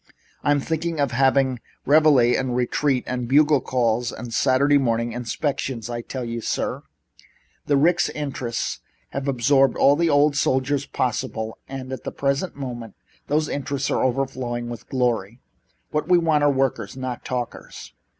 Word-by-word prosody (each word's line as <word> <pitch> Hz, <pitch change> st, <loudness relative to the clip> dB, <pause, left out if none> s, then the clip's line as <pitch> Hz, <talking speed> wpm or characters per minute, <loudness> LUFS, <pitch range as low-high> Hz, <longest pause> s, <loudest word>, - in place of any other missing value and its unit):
"I'm 145 Hz, 0 st, +3 dB
thinking 160 Hz, +2 st, -2 dB
of 140 Hz, -3 st, +1 dB
having 130 Hz, 0 st, +2 dB, 0.3 s
reveille 145 Hz, -5 st, +5 dB
and 130 Hz, -2 st, -1 dB
retreat 125 Hz, +2 st, +1 dB
and 125 Hz, -1 st, -3 dB
bugle 145 Hz, +1 st, +4 dB
calls 120 Hz, -2 st, 0 dB
and 120 Hz, -2 st, -8 dB
Saturday 140 Hz, +4 st, +3 dB
morning 115 Hz, -2 st, 0 dB
inspections. 120 Hz, 0 st, -3 dB
I 120 Hz, 0 st, -3 dB
tell 125 Hz, +1 st, -5 dB
you, 115 Hz, 0 st, -4 dB
sir, -, -, -2 dB, 0.9 s
the 145 Hz, -, +3 dB
Ricks 175 Hz, +5 st, +3 dB
interests 135 Hz, -5 st, -3 dB, 0.3 s
have 135 Hz, +1 st, -4 dB
absorbed 135 Hz, +1 st, +3 dB
all 140 Hz, -, +5 dB
the 170 Hz, +2 st, +1 dB
old 145 Hz, 0 st, +4 dB
soldiers 135 Hz, 0 st, +1 dB
possible 110 Hz, -2 st, -2 dB
and 130 Hz, -1 st, -6 dB
at 130 Hz, -, -7 dB
the -, -, -4 dB
present 140 Hz, +6 st, -1 dB
moment 120 Hz, -5 st, -6 dB, 0.3 s
those 155 Hz, +1 st, +1 dB
interests 140 Hz, -1 st, -2 dB
are -, -, +1 dB
overflowing 125 Hz, -2 st, -2 dB
with 120 Hz, -, -9 dB
glory. 120 Hz, -3 st, -1 dB, 0.5 s
What 150 Hz, -, -2 dB
we 180 Hz, -, +6 dB
want 160 Hz, -3 st, +2 dB
are 145 Hz, -, +5 dB
workers, 135 Hz, -1 st, -1 dB
not 130 Hz, -2 st, -5 dB
talkers. 125 Hz, -2 st, -6 dB
130 Hz, 150 wpm, -23 LUFS, 120-145 Hz, 0.9 s, we